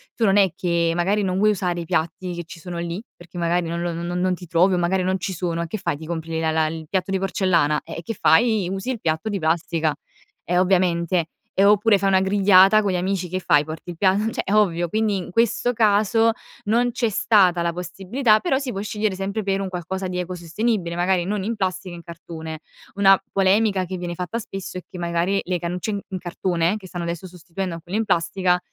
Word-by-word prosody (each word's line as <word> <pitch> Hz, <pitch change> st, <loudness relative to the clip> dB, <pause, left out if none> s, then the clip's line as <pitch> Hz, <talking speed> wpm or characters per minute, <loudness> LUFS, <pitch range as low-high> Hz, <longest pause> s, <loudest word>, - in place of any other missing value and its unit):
tu 230 Hz, -, +1 dB
non 195 Hz, -1 st, +4 dB
è 195 Hz, -3 st, +4 dB
che 170 Hz, -2 st, +1 dB
magari 195 Hz, +4 st, +1 dB
non 185 Hz, -1 st, -1 dB
vuoi 215 Hz, +2 st, +4 dB
usare 180 Hz, -3 st, -1 dB
i 170 Hz, -, -5 dB
piatti 165 Hz, +3 st, -2 dB
che 175 Hz, -, -5 dB
ci 165 Hz, +1 st, -11 dB
sono 175 Hz, +1 st, -7 dB
lì, 170 Hz, +3 st, -4 dB
perché 175 Hz, 0 st, -13 dB
magari 170 Hz, 0 st, 0 dB
non 170 Hz, +1 st, -3 dB
lo 175 Hz, 0 st, -2 dB
no 170 Hz, +1 st, -4 dB
non 180 Hz, +1 st, +1 dB
ti 180 Hz, -, -11 dB
trovi 175 Hz, +4 st, +3 dB
o -, -, +2 dB
magari 180 Hz, +2 st, +1 dB
non 185 Hz, +1 st, 0 dB
ci 190 Hz, +1 st, -4 dB
sono 170 Hz, -1 st, -2 dB
e -, -, -5 dB
che 195 Hz, -, -4 dB
fai, 170 Hz, -4 st, -1 dB
ti 160 Hz, -, -9 dB
compri 165 Hz, 0 st, -5 dB
le 160 Hz, -, -1 dB
la 160 Hz, -1 st, +1 dB
la 160 Hz, 0 st, +2 dB
il 160 Hz, 0 st, -6 dB
piatto 190 Hz, 0 st, -1 dB
di 195 Hz, -, +1 dB
porcellana, 175 Hz, -6 st, +1 dB
eh, -, -, -8 dB
e -, -, -6 dB
che 225 Hz, -, -4 dB
fai, 215 Hz, +1 st, +4 dB
usi 195 Hz, +7 st, -3 dB
il 245 Hz, -, -4 dB
piatto 160 Hz, +4 st, -1 dB
di 205 Hz, -2 st, -2 dB
plastica. 160 Hz, -1 st, 0 dB, 0.5 s
E 180 Hz, -, 0 dB
ovviamente, 180 Hz, -2 st, +2 dB, 0.3 s
ehm, 195 Hz, +1 st, +4 dB
oppure 210 Hz, 0 st, +4 dB
fai 195 Hz, +1 st, +1 dB
una 190 Hz, -1 st, +4 dB
grigliata 195 Hz, +1 st, +5 dB
con 200 Hz, -2 st, 0 dB
gli -, -, -1 dB
amici 185 Hz, 0 st, -1 dB
che 185 Hz, +2 st, -2 dB
fai, 145 Hz, -5 st, +3 dB
porti 160 Hz, +3 st, -7 dB
il 170 Hz, -, -10 dB
pia 190 Hz, +1 st, +3 dB
cioè -, -, -2 dB
è 200 Hz, -, -2 dB
ovvio, 175 Hz, -5 st, +2 dB
quindi 215 Hz, +1 st, +1 dB
in 185 Hz, -, -6 dB
questo 235 Hz, +3 st, +1 dB
caso, 220 Hz, 0 st, +3 dB, 0.3 s
non 235 Hz, +4 st, +2 dB
c'è 235 Hz, -1 st, 0 dB
stata 190 Hz, -4 st, +3 dB
la 170 Hz, 0 st, 0 dB
possibilità, 195 Hz, +7 st, +1 dB
però 305 Hz, -3 st, +1 dB
si 270 Hz, -2 st, -3 dB
può 195 Hz, -, -4 dB
scegliere 210 Hz, 0 st, -1 dB
sempre 195 Hz, +3 st, -3 dB
per 195 Hz, 0 st, 0 dB
un 195 Hz, -, -3 dB
qualcosa 185 Hz, +1 st, -4 dB
di 180 Hz, 0 st, -4 dB
ecosostenibile, 180 Hz, +2 st, -2 dB
magari 175 Hz, 0 st, +1 dB
non 200 Hz, +1 st, -2 dB
in 230 Hz, +4 st, -2 dB
plastica, 185 Hz, -2 st, -3 dB
in 170 Hz, -, -9 dB
cartone. 160 Hz, -2 st, -8 dB, 0.3 s
Una 195 Hz, -1 st, +5 dB
polemica 195 Hz, 0 st, +2 dB
che 185 Hz, +1 st, -5 dB
viene 175 Hz, -1 st, -5 dB
fatta 180 Hz, +6 st, -3 dB
spesso 195 Hz, -4 st, -7 dB
è -, -, -11 dB
che -, -, -9 dB
magari 175 Hz, +3 st, 0 dB
le 180 Hz, -1 st, -2 dB
cannucce 180 Hz, +5 st, -3 dB
in 200 Hz, -1 st, -3 dB
in 190 Hz, -, -4 dB
cartone 175 Hz, +1 st, -1 dB
che 195 Hz, -3 st, -11 dB
stanno 175 Hz, -1 st, -5 dB
adesso 170 Hz, +2 st, -4 dB
sostituendo 180 Hz, +1 st, -6 dB
a -, -, -7 dB
quelle 180 Hz, +4 st, -4 dB
in 225 Hz, -, 0 dB
plastica, 180 Hz, 0 st, +1 dB
185 Hz, 235 wpm, -22 LUFS, 170-200 Hz, 0.5 s, grigliata